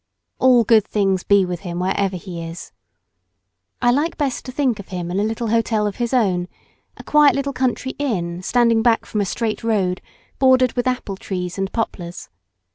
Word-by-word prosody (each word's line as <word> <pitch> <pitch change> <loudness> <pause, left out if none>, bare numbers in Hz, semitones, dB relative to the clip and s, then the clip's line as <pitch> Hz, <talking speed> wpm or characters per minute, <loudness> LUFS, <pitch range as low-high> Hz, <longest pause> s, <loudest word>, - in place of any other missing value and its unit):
All 255 -2 +5
good 220 -1 +5
things 195 -3 +1
be 200 -2 +4
with 180 -1 -4
him 175 0 -6
wherever 190 +1 0
he 175 -1 -7
is! 165 +1 -8 1.1
I 240 - +5
like 295 +6 0
best 280 -4 -1
to 255 - -6
think 255 -5 0
of 200 - -9
him 175 -2 -5
in 185 - -1
a - - +1
little 225 +1 -2
hotel 225 -1 +1
of 205 - -3
his 240 -1 -2
own, 190 -8 +1 0.5
a - - -10
quiet 300 -1 +5
little 280 0 -2
country 260 0 -1
inn 180 -11 -2
standing 230 +2 +3
back 230 -1 +2
from 210 - -2
a - - 0
straight 220 +4 -2
road 195 -5 0 0.4
bordered 260 -2 +4
with 245 0 -1
apple 245 -6 -2
trees 180 -1 -5
and 195 0 -2
poplars. 175 - -4
215 Hz, 190 wpm, -20 LUFS, 185-245 Hz, 1.1 s, All